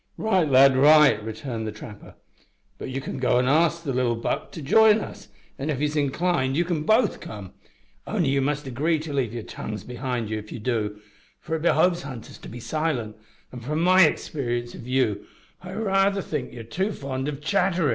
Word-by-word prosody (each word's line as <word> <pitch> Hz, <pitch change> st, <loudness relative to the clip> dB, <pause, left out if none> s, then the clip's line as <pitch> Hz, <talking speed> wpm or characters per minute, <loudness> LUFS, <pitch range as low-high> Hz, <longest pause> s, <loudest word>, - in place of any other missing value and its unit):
"Right, 190 Hz, -8 st, +1 dB
lad, 135 Hz, 0 st, +6 dB
right" 150 Hz, -5 st, +6 dB
returned 110 Hz, +1 st, -5 dB
the -, -, -3 dB
trapper, 105 Hz, 0 st, -11 dB, 0.6 s
"but -, -, -6 dB
you 130 Hz, +1 st, -3 dB
can 130 Hz, -, -6 dB
go 125 Hz, -1 st, +2 dB
an' 125 Hz, 0 st, +2 dB
ask 165 Hz, +4 st, +2 dB
the 140 Hz, -4 st, -2 dB
little 125 Hz, -2 st, +1 dB
Buck 115 Hz, -, -3 dB
to 160 Hz, -, -7 dB
jine 220 Hz, +8 st, +6 dB
us, -, -, -8 dB, 0.3 s
an' 140 Hz, +3 st, -3 dB
if 145 Hz, -, 0 dB
he's 150 Hz, +2 st, -1 dB
inclined 145 Hz, -1 st, 0 dB
you 175 Hz, -, +2 dB
can 170 Hz, -3 st, -1 dB
both 220 Hz, +7 st, +2 dB
come 100 Hz, -4 st, -9 dB, 0.5 s
only 155 Hz, -, 0 dB
you 135 Hz, 0 st, +2 dB
must 145 Hz, +2 st, -1 dB
agree 145 Hz, +6 st, 0 dB
to 155 Hz, -1 st, -6 dB
leave 130 Hz, -6 st, 0 dB
yer 115 Hz, -1 st, -5 dB
tongues 105 Hz, -2 st, -7 dB
behind 125 Hz, -2 st, -4 dB
ye 110 Hz, -, -1 dB
if 105 Hz, 0 st, -12 dB
ye -, -, -5 dB
do, 105 Hz, -3 st, -2 dB, 0.4 s
for 160 Hz, -1 st, -4 dB
it 160 Hz, -, -3 dB
behoves 175 Hz, +1 st, +3 dB
hunters 130 Hz, -7 st, -9 dB
to -, -, -10 dB
be 120 Hz, -, -8 dB
silent, 130 Hz, -6 st, -2 dB, 0.4 s
and 125 Hz, -2 st, -9 dB
from 150 Hz, +5 st, -2 dB
my 185 Hz, +1 st, +6 dB
experience 120 Hz, -6 st, -3 dB
of 115 Hz, -, -10 dB
you 125 Hz, -6 st, 0 dB, 0.4 s
I 185 Hz, +1 st, -8 dB
raither 195 Hz, -2 st, +1 dB
think 145 Hz, -5 st, -4 dB
yer 120 Hz, -, -8 dB
too 190 Hz, -, -2 dB
fond 135 Hz, -1 st, -4 dB
o' -, -, -3 dB
chatterin'." 175 Hz, +1 st, +1 dB
140 Hz, 200 wpm, -24 LUFS, 120-165 Hz, 0.6 s, lad